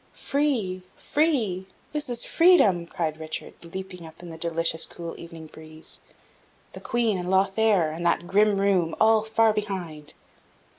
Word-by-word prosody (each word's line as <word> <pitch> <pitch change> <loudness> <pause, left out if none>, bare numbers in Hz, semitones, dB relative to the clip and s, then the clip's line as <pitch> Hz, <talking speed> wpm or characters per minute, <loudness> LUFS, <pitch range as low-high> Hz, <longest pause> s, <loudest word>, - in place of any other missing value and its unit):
"Free! 250 -11 -1 0.2
free! 230 - 0 0.2
this 300 -2 -4
is 240 -1 -1
freedom!" 275 - +4
cried 160 -3 -3
Richard, 160 0 -6
leaping 180 +1 -8
up 160 +1 -13
in 175 - -9
the - - -8
delicious 165 -1 +1
cool 170 -1 -8
evening 165 -1 -10
breeze; 155 0 -12 0.7
"the - - -9
Queen 230 -5 0
and 180 0 -4
Lothaire, 195 -2 +2
and 165 +2 -6
that 170 0 +1
grim 205 +2 +3
room, 185 -5 +1
all 220 0 +5
far 220 0 +2
behind." 180 -8 -5
185 Hz, 145 wpm, -25 LUFS, 165-220 Hz, 0.7 s, all